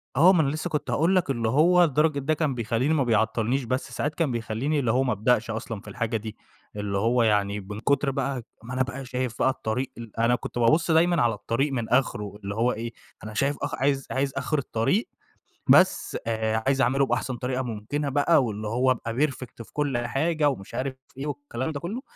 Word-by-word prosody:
آه، 185 +3 +7
ما 170 - +4
أنا 140 - +1
لسه 155 +4 -3
كنت 150 -4 -2
هاقول 165 +9 +2
لك 180 -5 +1
اللي 115 -4 0
هو 175 +7 +5
لدرجة 150 -1 +2
ده 140 +3 0
كان 150 -4 0
بيخلّيني 120 +5 0
ما 145 -4 +2
بيعطلنيش، 115 +3 +1
بس 130 +3 -2
ساعات 150 +1 -2
كان 155 -5 0
بيخلّيني 120 +6 -1
اللي 120 -5 +1
هو 130 +3 +2
ما 125 - 0
ابدأش 115 +2 +1
أصلًا 110 -2 -5
في - - -18
الحاجة 115 -1 -2
دي، 110 0 -8 0.4
اللي 105 -1 -2
هو 115 +4 +2
يعني 105 -1 +2
من 105 +2 -7
كتر 140 +3 +1
بقى 135 -2 -2 0.2
ما 125 +2 -7
أنا 130 - +2
بقى 130 +1 -6
شايف 125 -2 -2
بقى 130 - +4
الطريق 125 0 -2
ال 115 -1 -9
أنا 120 +2 +4
كنت - - -6
بابُص 155 +8 +3
دايمًا 170 +2 +4
على 120 -1 +3
الطريق 135 +7 -1
من 120 -3 -2
آخره، 105 -5 0
اللي 100 +1 -4
هو 120 +2 +2
إيه، 115 +1 -5 0.3
أنا 110 - -7
شايف 135 +6 0
آخ 140 0 -2
عايز 135 0 0
عايز 135 +1 0
آخر 155 - 0
الطريق، 125 - 0 0.6
بس - - +4
آآ، 110 0 0
عايز 135 0 +3
أعمله 135 +3 +3
بأحسن 125 0 -2
طريقة 125 +2 -2
ممكنة 125 +5 -3
بقى، 145 +2 +3
واللي 110 -2 -4
هو 125 +4 +2
أبقى 115 -2 -2
perfect 125 -3 -9
في - - -21
كُلّ 145 -4 0
حاجة 145 +6 +1
ومش 95 -9 -6
عارف 130 0 -2 0.2
إيه 140 +2 -4
والكلام 145 -1 -4
ده 145 - -4
كلّه، 200 - -4
130 Hz, 215 wpm, -26 LUFS, 115-145 Hz, 0.6 s, آه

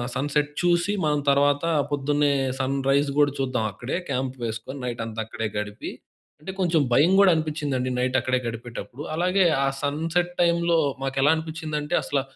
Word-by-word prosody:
Sunset 145 +2 0
చూసి 175 +3 +2
మనం 150 -1 +2
తర్వాత 145 +2 +3 0.3
పొద్దున్నే 145 +1 +1 0.3
సన్‌రైజ్ 135 +2 +1
కూడా 145 -1 +4
చూద్దాం 130 -4 0
అక్కడే 120 - -4
క్యాంప్ 130 0 -2
వేసుకొని 115 +5 -5
నైట్ 120 -1 -3
అంతా 110 0 -6
అక్కడే 110 0 -4
గడిపి. 105 0 -4 0.5
అంటే 190 +4 -6
కొంచెం 170 -4 +2
భయం 155 +8 +5
కూడా 195 -2 +7
అనిపించిందండి 145 -5 -2
నైట్ 130 +1 +1
అక్కడే 130 -1 0
గడిపేటప్పుడు. 120 +4 -7
అలాగే 185 +3 +2 0.2
ఆ - - +1 0.2
సన్‌సెట్ 165 +5 0
టైమ్‌లో 170 -1 +3 0.2
మాకెలా 135 +3 +2
అనిపించిందంటే 160 0 -3
అసల 140 -2 0
145 Hz, 145 wpm, -24 LUFS, 130-160 Hz, 0.5 s, కూడా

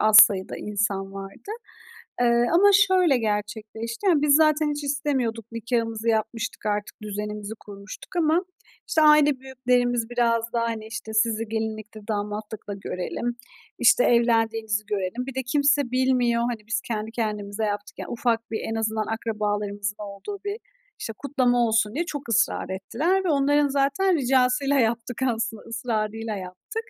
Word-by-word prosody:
az 215 0 +5
sayıda 200 -4 +6
insan 200 -2 -2
vardı. 195 - -9 0.7
Eee, 235 0 +4
ama 390 +4 +6 0.2
şöyle 365 -7 +4
gerçekleşti, 220 - -3
yani, 330 -6 +4
biz 290 -1 +5
zaten 305 -1 +4
hiç 295 0 -4
istemiyorduk. 265 -6 -1
Nikâhımızı 230 -1 -1
yapmıştık, 225 +2 -2
artık 210 0 -2
düzenimizi 210 0 -5
kurmuştuk 200 - -11
ama, 335 +1 +2 0.4
işte, 315 - +2
aile 300 -2 +6
büyüklerimiz 245 -3 0
biraz 230 -1 +1
da, 235 - +1
hani, 230 -2 -2
işte, 220 0 -7
"Sizi 220 0 +1
gelinlikte, 220 -1 -4
damatlıkla 210 0 -4
görelim, 200 +5 -4 0.4
işte, - - +5
evlendiğinizi 225 -3 +2
görelim." 205 +4 -2
Bir 270 -1 -7
de 265 - -1
kimse 285 0 +2
bilmiyor, 250 -2 +2
hani, 235 -3 -3
biz 225 0 -1
kendi 220 -1 -3
kendimize 210 -2 -3
yaptık, 205 0 -4
yani. - - -6
Ufak 230 -1 -1
bir 220 - -1
en - - -2
azından 220 -1 -1
akrabalarımızın 205 -2 -2
olduğu 210 - -7
bir, 405 +1 -2 0.4
işte, 225 - -5
kutlama 245 -4 +2
olsun 220 0 +1
diye 335 +3 0
çok 290 -6 -6
ısrar 225 -4 +1
ettiler 300 - 0
ve 360 - 0
onların 290 0 +3
zaten 280 +7 +2
ricasıyla 270 +2 +2
yaptık 230 +1 -1
aslı 230 -2 -1
ısrarıyla 225 -2 -2
yaptık. 185 - -9
230 Hz, 145 wpm, -25 LUFS, 215-265 Hz, 0.7 s, sayıda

